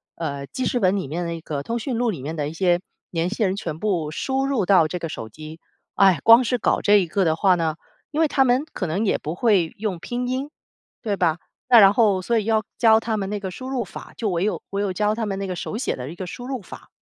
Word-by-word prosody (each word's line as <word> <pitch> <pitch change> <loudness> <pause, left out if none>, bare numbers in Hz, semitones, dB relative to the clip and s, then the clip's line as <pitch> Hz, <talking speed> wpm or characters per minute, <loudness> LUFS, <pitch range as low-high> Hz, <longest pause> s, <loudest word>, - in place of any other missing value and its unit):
呃， 140 -4 -4
记 260 - -4
事 245 - 0
本 190 -2 +3
里 190 - -3
面 170 +5 -3
那 170 -1 -4
个 145 -3 -4
通 235 +7 -3
讯 245 0 -3
录 240 -1 +1
里 155 -10 -7
面 155 +4 -5
的 150 -2 -2
一 - - -8
些 175 0 +2 0.3
联 165 0 0
系 215 +2 -1
人 190 0 +1
全 165 -6 -5
部 175 -7 -1
输 265 - -1
入 265 -9 0
到 180 -6 +5
这 180 +2 -4
个 165 - -4
手 110 - -6
机。 155 +6 -10 0.4
唉， 190 -5 +5
光 230 +3 +8
是 250 +1 0
搞 - - +1
这 205 - +4
一 190 -4 +1
个 190 +3 0
的 160 -1 +2
话 185 +2 +3
呢， 160 -2 -1 0.4
因 305 +2 0
为 320 - +4
他 270 -2 +2
们 250 +2 +2
可 185 - -3
能 190 +8 -1
也 - - +2
不 155 - -5
会 190 -6 +2
用 205 -4 -2
拼 245 +6 -3
音， 265 +3 -2 0.5
对 205 -4 -2
吧， 170 -3 +2 0.3
那 240 -2 +9
然 195 -1 +7
后 205 -5 +3
所 235 +5 0
以 210 - -4
要 220 -1 +2
教 220 -2 +5
他 225 -1 -2
们 195 -2 -3
那 210 - -2
个 190 -1 -5
输 255 +8 -8
入 255 -3 -1
法， 180 - -11
就 220 - -1
唯 175 0 0
有 210 - -1
唯 200 +1 -1
有 190 -2 -1
教 210 +2 +1
他 225 - -2
们 195 -2 -3
那 195 - -3
个 185 - -3
手 210 - -5
写 - - -1
的 125 +2 -6
一 170 - -9
个 185 - -6
输 245 +6 -8
入 260 -3 -4
法。 185 - -12
195 Hz, 295 characters per minute, -23 LUFS, 170-230 Hz, 0.5 s, 那